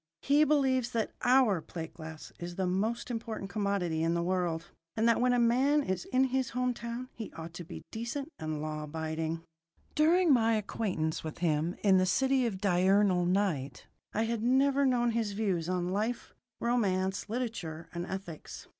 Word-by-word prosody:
He 290 +2 +5
believes 265 -5 +2
that 225 -2 0
"our" 245 -8 +4
plate 165 0 -7
glass 160 -1 -9
is 175 0 -6
the 190 - 0
most 215 +7 -1
important 225 -4 -4
commodity 200 -5 0
in 165 +1 +1
the 170 - 0
world, 175 -2 -1 0.3
and 220 +1 +3
that 230 0 +3
when 250 0 +4
a 245 - +3
man 260 +5 +3
is 190 -6 -2
in 255 0 +2
his 260 -2 +1
home 250 0 +1
town 235 +2 -6
he 225 - -7
ought 165 0 -8
to 175 - -7
be 170 - -9
decent 240 +6 -4
and 155 -1 -3
law 155 0 -3
abiding. 160 +1 -3 0.5
During 330 +1 +4
my 230 -2 +4
acquaintance 190 -7 -2
with 155 -1 -6
him 165 0 0
in 195 -2 +6
the 185 - +2
City 265 +5 +2
of 195 -5 -4
Diurnal 190 -1 +3
Night 170 -9 0 0.3
I 220 - 0
had 225 -1 -1
never 270 +3 +3
known 240 -2 +2
his 225 -3 -1
views 190 -5 -1
on 180 -1 0
life, 220 +4 -2 0.3
romance, 195 -5 0
literature, 215 -10 -4
and 170 0 -4
ethics. 190 -5 -7
200 Hz, 175 wpm, -31 LUFS, 175-240 Hz, 0.5 s, in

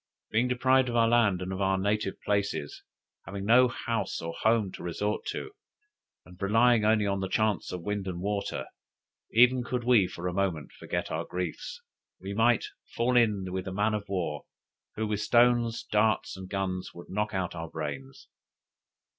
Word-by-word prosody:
Being 115 +3 +2
deprived 130 +1 +3
of 120 - -3
our 115 -1 +4
land 105 -6 +3
and 95 +1 -4
of 95 - -4
our 95 0 +2
native 100 +1 -1
places, 100 -8 -1 0.5
having 100 0 -5
no 125 +4 +6
house 115 -4 -3
or 85 0 -5
home 110 -3 +2
to - - -10
resort 105 +5 -2
to, 415 - -4 0.7
and 90 +1 -16
relying 115 +3 +4
only 105 -1 +3
on 100 -1 0
the 95 -1 -3
chances 110 -1 0
of 90 -2 -5
wind 105 0 -3
and 90 -2 -4
water, 100 +2 -2 0.7
even 125 +2 +5
could 125 0 -3
we 115 -6 +4
for 90 +1 -6
a 90 - -2
moment 90 -6 -1
forget - - -4
our - - -1
griefs, 90 - -5 0.4
we 95 +1 -6
might 115 +2 +3 0.3
fall 125 +2 +1
in 105 -6 +2
with 95 0 -4
a - - -3
man 105 +3 +1
of 105 -2 -4
war, 85 -6 -3 0.5
who 110 - -1
with 105 -1 -2
stones, 120 0 +3
darts, 110 -2 +1
and 95 -1 -9
guns, 95 -2 -3
would 85 - -11
knock 105 +1 -1
out 95 -2 -2
our 80 -1 -6
brains! 65 -2 -6
105 Hz, 180 wpm, -28 LUFS, 95-115 Hz, 0.7 s, no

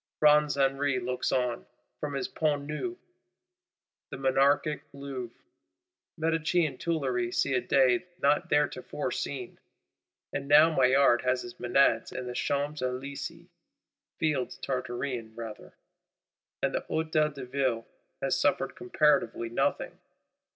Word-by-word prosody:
Bronze 150 -1 +5
Henri 135 0 +2
looks 125 +1 -2
on, 125 -3 -1 0.3
from 145 -2 -3
his 135 - -2
Pont 150 -3 0
Neuf; 255 - -4 1.1
the - - -6
Monarchic 135 +3 +2
Louvre, 135 -4 -7 0.8
Medicean 160 -2 +1
Tuileries 130 -8 -1
see - - +2
a 125 - +2
day 130 +3 +3
not 145 -4 +2
theretofore 145 -1 0
seen. - - -5 0.7
And 140 - -3
now 155 +3 +6
Maillard 130 -2 +5
has 125 0 0
his 120 0 -10
Menads 120 -2 +3
in 130 - -5
the 125 - -5
Champs 145 +3 -1
Elysées 130 +2 -5 0.7
(Fields 150 -5 -1
Tartarean 125 -3 -4
rather); 115 -2 -8 0.9
and - - +1
the - - 0
Hôtel 155 -2 0
de 135 -2 -6
Ville 125 -3 -1 0.4
has 135 - +2
suffered 140 +1 +1
comparatively 150 -10 +1
nothing. 115 - -1
135 Hz, 120 wpm, -29 LUFS, 125-150 Hz, 1.1 s, now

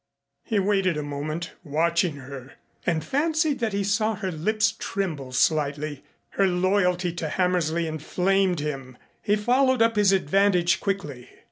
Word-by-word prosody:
He 220 - -1
waited 195 -4 +1
a 150 - -2
moment, 150 +4 -4
watching 165 +1 +1
her, 135 -1 -10 0.3
and 165 -3 0
fancied 310 0 +1
that 225 -3 -1
he 200 0 -1
saw 215 +2 +1
her 190 -2 -4
lips 210 +7 +1
tremble 160 -10 -3
slightly. 145 +2 0 0.3
Her 195 - +2
loyalty 180 -1 +1
to 165 -2 -4
Hammersley 170 -2 0
inflamed 180 +3 0
him. 135 -4 -5 0.2
He 205 -1 +2
followed 250 +3 +3
up 230 -1 +1
his 205 -2 +5
advantage 185 -1 +2
quickly. 150 -11 -4
180 Hz, 140 wpm, -25 LUFS, 155-200 Hz, 0.3 s, his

